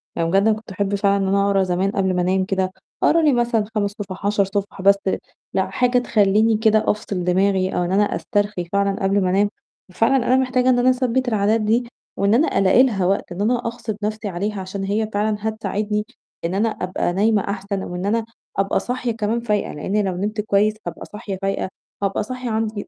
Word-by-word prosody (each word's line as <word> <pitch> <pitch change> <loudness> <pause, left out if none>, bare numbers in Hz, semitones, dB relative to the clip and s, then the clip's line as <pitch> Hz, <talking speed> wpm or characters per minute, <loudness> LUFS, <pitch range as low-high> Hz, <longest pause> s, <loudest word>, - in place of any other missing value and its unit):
يعني 165 0 0
جدًا 200 +3 +4
كنت 215 -2 -9
أحب 200 +1 -1
فعلًا 200 0 +2
إن - - 0
أنا 200 +1 +2
أقرا 195 -1 +3
زمان 185 +2 0
قبل 190 -2 0
ما 180 - +1
أنام 185 +1 +1
كده، 190 -1 -1 0.3
أقرأ 330 - +4
لي 300 -3 +4
مثلًا 235 -3 +1
5 205 -1 0
صُفَح، 190 0 -7
10 205 -1 +3
صُفَح، 200 0 -4
بس 200 +1 +6 0.6
لأ، 190 - 0
حاجة 250 0 +2
تخلّيني 215 -1 +3
كده 220 -1 +3
أفصِل 205 -4 -4
دماغي 190 +1 +2
أو 180 - +1
إن 175 - -2
أنا 200 +2 +4
أسترخي 205 -4 -1
فعلًا 200 0 0
قبل 195 +1 +2
ما 185 - +1
أنام، 200 +2 +2 0.4
ففعلًا 225 +8 +2
أنا 255 - +4
محتاجة 255 -1 +2
إن 250 -1 +4
أنا 250 +1 +4
أثبِّت 255 0 +1
العادات 215 0 +2
دي 230 +3 +1 0.3
و 200 - 0
أنا 235 +10 +3
ألاقي 195 +6 +5
لها 200 -8 +1
وقت، 195 0 0
إن 175 +3 -4
أنا 235 +3 +2
أغصِب 230 -2 -4
نَفْسي 215 0 -2
عليها 200 +2 -3
عشان 195 +1 -5
هي 210 +2 -1
فعلًا 210 +1 0
هتساعدني 210 -1 -2 0.4
إن 170 - -1
أنا 225 +3 +2
أبقى 185 -3 -2
نايمة 210 +1 +2
أحسن 200 0 -3
أو 180 - -6
إن 180 +2 -3
أنا 225 +2 0 0.3
أبقى 195 0 +1
صاحية 250 -1 -2
كمان 225 +1 -1
فايقة، 210 -3 -1
لإنّي 200 +8 -1
لو 190 -2 -2
نمت 210 +3 -2
كويّس 210 0 +2
هابقى 170 - -6
صاحية 210 -2 -6
فايقة، 195 -1 -1 0.3
هابقى 195 +1 0
صاحية 255 +1 -5
عندي 220 -2 -2
205 Hz, 205 wpm, -21 LUFS, 195-220 Hz, 0.6 s, بس